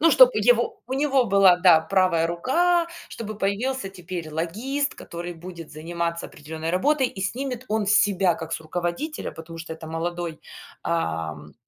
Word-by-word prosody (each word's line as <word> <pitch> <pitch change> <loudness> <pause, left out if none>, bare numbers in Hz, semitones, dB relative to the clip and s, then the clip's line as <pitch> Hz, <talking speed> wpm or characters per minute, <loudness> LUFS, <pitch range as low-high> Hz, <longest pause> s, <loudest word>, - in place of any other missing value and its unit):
Ну, 330 +1 +6
чтоб - - +8 0.2
его 450 -4 +3
у 260 - -3
него 275 -2 +3
была, 195 -3 +5
да, 170 -4 +7
правая 170 -1 +2
рука, 335 - +2 0.2
чтобы 215 -1 -6
появился 215 +4 -1
теперь 180 -3 -7
логист, 235 - -1
который 175 +1 -7
будет 170 -1 -10
заниматься 170 +2 -3
определенной 160 +2 -6
работой 265 +8 +2
и 190 - -9
снимет 250 +4 -3
он 215 0 +1
с 205 - +3
себя 190 -4 +2
как 165 0 -7
с - - -2
руководителя, 175 - -3
потому 165 +1 -10
что 165 0 -6
это 160 0 -10
молодой, 170 0 -3 0.4
ам, 80 - -3
180 Hz, 160 wpm, -24 LUFS, 165-250 Hz, 0.4 s, чтоб